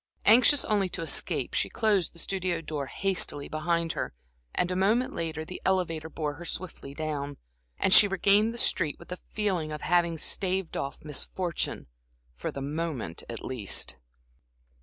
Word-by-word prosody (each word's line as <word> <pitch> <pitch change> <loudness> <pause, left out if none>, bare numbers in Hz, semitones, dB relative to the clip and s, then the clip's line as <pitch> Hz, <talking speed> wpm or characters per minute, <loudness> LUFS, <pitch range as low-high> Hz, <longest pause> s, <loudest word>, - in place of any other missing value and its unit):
Anxious 250 +6 +7
only 200 -3 +2
to 165 - -3
escape, 165 - +1
she - - +1
closed 205 -6 +2
the - - -18
studio 185 -1 -1
door 150 -4 -4
hastily 175 -4 -1
behind 165 +1 0
her, - - -4 0.4
and 180 - +1
a - - 0
moment 215 +7 +2
later 160 -1 -3
the 180 - -8
elevator 165 -4 0
bore 150 -2 -3
her - - -5
swiftly 170 -5 -4
down, 145 -2 -3 0.4
and 190 - +3
she 205 - +9
regained 200 +3 +4
the 235 - -7
street, 170 -9 +1
with 170 - -14
the 180 - -5
feeling 185 -7 0
of 150 - -5
having 170 -1 +2
staved 185 +2 0
off 140 - -3
misfortune, 165 +3 -2 0.5
for - - -4
the 140 - -5
moment 145 - -3
at 115 - -6
least. 120 -7 -1
170 Hz, 160 wpm, -28 LUFS, 155-190 Hz, 0.5 s, she